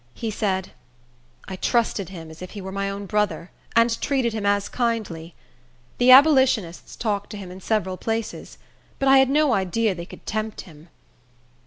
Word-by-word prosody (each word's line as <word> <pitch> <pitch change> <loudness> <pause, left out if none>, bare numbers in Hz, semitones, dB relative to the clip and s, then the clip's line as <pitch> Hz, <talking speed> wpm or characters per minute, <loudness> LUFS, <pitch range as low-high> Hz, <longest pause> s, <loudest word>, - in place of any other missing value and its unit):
He 225 -2 -4
said, 190 -3 -2 0.8
"I 190 - -5
trusted 220 -4 0
him 165 -4 -9
as 160 - -14
if 185 - -8
he - - -4
were 190 0 -7
my 195 0 -2
own 200 +1 -5
brother, 210 -3 -1 0.2
and 230 0 +3
treated 260 -5 0
him 210 -2 -2
as 200 0 +1
kindly. 215 -9 -3 0.6
The 245 +1 +4
abolitionists 260 - +5
talked 205 -3 -2
to 210 - -7
him 190 -3 -8
in 185 +1 -10
several 190 -3 -1
places; 225 +1 -4 0.4
but 275 - -1
I 270 0 +7
had 265 -1 +4
no 295 -1 +3
idea 200 +2 +1
they 170 -1 -8
could - - -13
tempt 215 0 -3
him. 160 -1 -16
210 Hz, 175 wpm, -23 LUFS, 185-235 Hz, 0.8 s, I